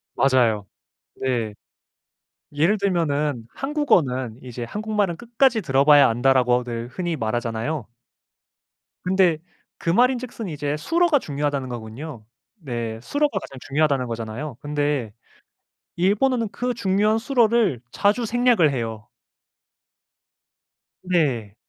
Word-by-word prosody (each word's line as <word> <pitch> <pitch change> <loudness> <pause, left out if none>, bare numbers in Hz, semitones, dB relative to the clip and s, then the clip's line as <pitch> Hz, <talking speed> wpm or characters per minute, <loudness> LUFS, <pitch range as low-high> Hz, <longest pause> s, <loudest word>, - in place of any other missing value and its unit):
맞아요. 120 -7 +2 0.5
네. 120 -5 -1 1.0
예를 160 +8 +2
들면은 150 - 0
한국어는 160 - 0
이제 125 -1 -6
"한국말은 210 - -1
끝까지 240 +2 +2
들어봐야 140 -2 +5
안다."라고들 120 -1 +1
흔히 175 +2 -3
말하잖아요. 115 +3 -2 1.2
근데 180 -3 +3 0.4
그 - - -3
말인즉슨 245 +2 +1
이제 150 -2 -3
술어가 330 - +2
중요하다는 145 - -2
거군요. 120 +2 -7 0.3
네 120 - -5
술어가 290 - 0
가장 135 -7 -10
중요하다는 140 -2 +1
거잖아요. 115 +4 -5
근데 145 -6 -1 0.8
일본어는 225 +6 +2
그 245 +3 -2
중요한 210 0 +2
술어를 230 - +2
자주 215 +4 +1
생략을 235 - +3
해요. 115 -3 -4 1.9
네. 135 - 0
150 Hz, 260 characters per minute, -23 LUFS, -, 1.9 s, 들어봐야